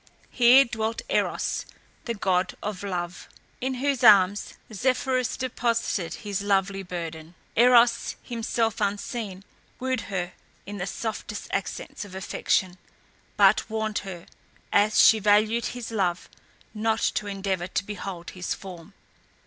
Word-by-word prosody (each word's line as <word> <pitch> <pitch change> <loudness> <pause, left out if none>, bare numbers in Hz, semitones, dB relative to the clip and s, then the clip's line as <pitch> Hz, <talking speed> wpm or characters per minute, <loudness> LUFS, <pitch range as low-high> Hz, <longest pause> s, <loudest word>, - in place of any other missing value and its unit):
Here 255 +2 +7
dwelt 225 0 -3
Eros, - - 0 0.4
the 235 - -2
god 185 -2 0
of 205 -3 -4
Love, 180 -3 -4 0.3
in 260 +1 -1
whose 275 0 -1
arms 200 -1 +5 0.2
Zephyrus 255 +2 0
deposited 230 -7 -1
his 205 -3 -3
lovely 195 -1 +1
burden. 170 -2 -7 0.2
Eros, 235 0 +5
himself 230 -2 -1
unseen, 200 -1 -3 0.4
wooed 260 -2 -1
her 180 -2 -3 0.3
in 205 +1 -7
the 180 - -3
softest 210 0 -5
accents 195 +2 -4
of 195 -2 -11
affection; 185 -1 -1 0.6
but - - +5
warned 220 -1 -1
her, 185 -4 -8 0.5
as 210 +1 +4
she 220 - +7
valued 215 +3 +3
his 245 -2 -6
love, 185 -5 -1 0.5
not 220 +1 0
to 205 - -2
endeavour 195 -3 -2
to 185 - -2
behold 195 -4 -6
his 180 -1 -3
form. 185 0 -11
205 Hz, 125 wpm, -26 LUFS, 185-230 Hz, 0.6 s, Here